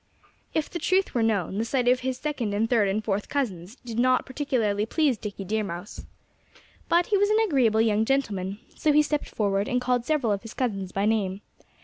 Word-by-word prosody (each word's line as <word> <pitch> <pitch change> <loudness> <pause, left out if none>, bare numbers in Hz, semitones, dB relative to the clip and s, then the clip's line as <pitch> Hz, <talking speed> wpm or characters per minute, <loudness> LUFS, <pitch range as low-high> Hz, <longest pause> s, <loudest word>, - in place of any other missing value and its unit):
If 315 - +1
the 345 - -5
truth 375 +2 +1
were 240 - +1
known, 205 -3 0
the - - +1
sight 245 +1 0
of 250 +1 +4
his 255 0 -2
second 255 -9 -2
and 220 +2 +1
third 225 -4 +3
and 205 +2 -1
fourth 205 -1 -1
cousins 205 -8 -3
did 230 -1 -4
not 255 +1 +3
particularly 245 -7 -1
please 295 -1 +2
Dickie 205 -2 -7
Deer 215 +3 -1
Mouse. 180 0 -7 0.8
But 345 +1 +4
he 415 - +2
was 405 +1 +3
an 430 - +3
agreeable 245 - +3
young 220 -1 +2
gentleman. 205 -7 -1 0.2
So 305 - +2
he 300 +1 +5
stepped 300 0 -2
forward 200 -1 0
and 250 -2 +1
called 250 -1 0
several 285 -8 +1
of 200 - -3
his 225 - -10
cousins 195 -7 -2
by 195 +1 0
name. 205 -3 0
225 Hz, 210 wpm, -26 LUFS, 205-270 Hz, 0.8 s, he